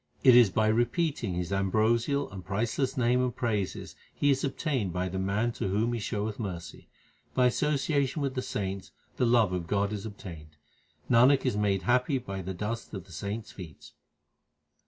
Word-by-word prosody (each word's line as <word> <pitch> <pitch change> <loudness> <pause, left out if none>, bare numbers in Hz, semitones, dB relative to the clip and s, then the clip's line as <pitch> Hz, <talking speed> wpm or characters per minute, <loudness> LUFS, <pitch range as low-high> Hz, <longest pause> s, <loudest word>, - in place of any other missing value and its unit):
It 130 -2 +8
is 120 -4 +7
by 110 +3 +1
repeating 120 - 0
His 90 +1 -2
ambrosial 115 +8 +1
and 95 -2 -8
priceless 115 +8 -1
name 125 0 +3
and 125 -2 -1
praises 105 -5 -2 0.2
He 145 - +2
is 135 0 0
obtained 135 - -1
by 90 +2 -2
the 95 +1 -3
man 100 +5 0
to 115 - -3
whom 110 +5 0
He 120 - -2
showeth 105 0 -3
mercy. 90 -7 -6 0.5
By 125 - +4
association 140 +2 +1
with 135 -2 -1
the 130 - -2
saints 95 -5 -4 0.3
the 125 - +2
love 115 -5 +4
of 90 -2 -3
God 100 +2 0
is 105 +1 -4
obtained: 80 -7 -10 0.5
Nanak 130 +4 +5
is 125 - +1
made 100 -2 +1
happy 125 +3 +2
by 100 -6 -5
the 95 +1 -5
dust 110 +4 -4
of 95 - -6
the 95 - -17
saints 100 +6 -5
feet. 75 -5 -11
110 Hz, 175 wpm, -29 LUFS, 95-125 Hz, 0.5 s, It